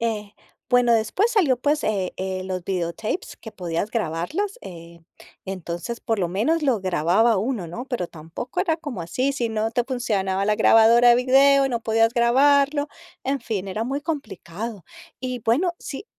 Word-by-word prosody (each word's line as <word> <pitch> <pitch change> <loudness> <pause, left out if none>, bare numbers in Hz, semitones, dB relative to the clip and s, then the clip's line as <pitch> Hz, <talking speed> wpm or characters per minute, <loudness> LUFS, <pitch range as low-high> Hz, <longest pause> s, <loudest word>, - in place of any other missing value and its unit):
eh, 215 -3 -3 0.4
bueno, 245 -1 +4
después 230 - +2
salió, 315 - +3
pues, 295 +4 0
eh 195 -4 -1
eh, 190 0 -3
los 185 -1 -4
videotapes 185 - -3
que 220 - -10
podías 175 +3 -3
grabarlos, 230 - -2
eh, 170 -1 -11 0.4
entonces, 185 +3 -5
por 225 -1 -1
lo 175 -3 0
menos 255 - 0
lo 255 -7 +1
grababa 190 +5 +2
uno, 215 -3 -2
¿no? 230 +10 -7
Pero 245 -10 -3
tampoco 170 - -6
era 330 -4 +1
como 290 - -6
así, 255 +12 -1
si 240 -4 -2
no 220 0 -1
te 245 +1 0
funcionaba 200 -7 -1
la 210 +1 +1
grabadora 230 +2 +6
de - - +7
video 275 +2 +5
y 270 - +1
no 235 - -1
podías 225 +1 +2
grabarlo, 280 +4 +3 0.4
en 275 +1 -1
fin, 200 -4 -3
era 215 +4 -3
muy 275 +3 -2
complicado, 230 - -6 0.4
y 255 -2 -4
bueno, 290 - +1
si 280 +8 -7
230 Hz, 170 wpm, -23 LUFS, 190-270 Hz, 0.4 s, de